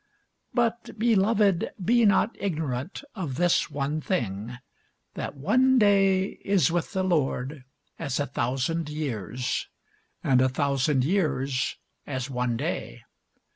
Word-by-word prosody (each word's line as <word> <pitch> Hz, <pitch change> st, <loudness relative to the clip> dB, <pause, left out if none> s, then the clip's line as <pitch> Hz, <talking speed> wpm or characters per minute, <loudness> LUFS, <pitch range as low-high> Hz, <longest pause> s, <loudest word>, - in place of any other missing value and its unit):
But, 235 Hz, -2 st, -1 dB
beloved, 210 Hz, -4 st, +3 dB, 0.2 s
be 235 Hz, +2 st, +4 dB
not 205 Hz, +3 st, +3 dB
ignorant 155 Hz, -, -3 dB
of 165 Hz, -, -4 dB
this 175 Hz, +3 st, +2 dB
one 145 Hz, +1 st, -2 dB
thing, 115 Hz, -, -2 dB, 0.6 s
that -, -, -5 dB
one 255 Hz, -, +3 dB
day 195 Hz, -3 st, +3 dB
is 190 Hz, -6 st, +3 dB
with 175 Hz, +4 st, -1 dB
the 190 Hz, -1 st, 0 dB
Lord 145 Hz, -5 st, -1 dB, 0.3 s
as 140 Hz, -5 st, -2 dB
a 145 Hz, -, +1 dB
thousand 135 Hz, +6 st, -1 dB
years, 125 Hz, -5 st, -3 dB, 0.6 s
and 130 Hz, -2 st, +4 dB
a 130 Hz, -, +4 dB
thousand 140 Hz, 0 st, +1 dB
years 140 Hz, -7 st, 0 dB, 0.3 s
as 130 Hz, -1 st, -3 dB
one 125 Hz, -2 st, -1 dB
day. -, -, -4 dB
150 Hz, 120 wpm, -26 LUFS, 130-195 Hz, 0.6 s, be